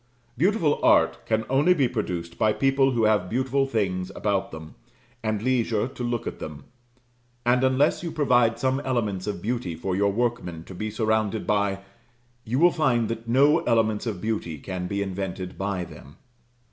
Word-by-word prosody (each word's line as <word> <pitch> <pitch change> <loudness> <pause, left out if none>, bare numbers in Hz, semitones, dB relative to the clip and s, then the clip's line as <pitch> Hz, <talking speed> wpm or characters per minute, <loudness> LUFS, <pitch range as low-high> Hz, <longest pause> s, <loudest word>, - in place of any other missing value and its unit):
Beautiful 170 - +2
art - - +4
can 110 0 0
only 145 +7 +3
be 140 -6 +3
produced 85 -7 -4
by 110 -1 +3
people 135 +1 +2
who 115 -2 +1
have 105 -4 +2
beautiful 130 +4 0
things 95 -6 -1
about 100 -3 -1
them, 80 0 -10 0.5
and 110 -2 -2
leisure 120 -3 +1
to 130 -2 -7
look 120 -1 -2
at - - -5
them; 75 -2 -7 0.8
and 125 +1 +3
unless 130 +3 +2
you 175 - -4
provide 120 -7 +3
some 130 +2 0
elements 110 -9 -2
of 105 - -4
beauty 110 -7 -2
for 90 +3 -3
your 100 +1 +2
workmen 100 -8 -2
to 95 - -11
be 105 +4 -4
surrounded 110 -1 0
by, 100 -2 0 0.6
you 120 +4 -2
will 175 +4 +6
find 120 -9 +1
that 115 0 -5
no 140 +7 +4
elements 110 -1 +1
of 100 -6 -4
beauty 105 -8 -2
can 90 +3 -5
be 100 +1 -1
invented 95 -1 -5
by 95 -2 -2
them. 70 -4 -12
110 Hz, 170 wpm, -25 LUFS, 95-130 Hz, 0.8 s, will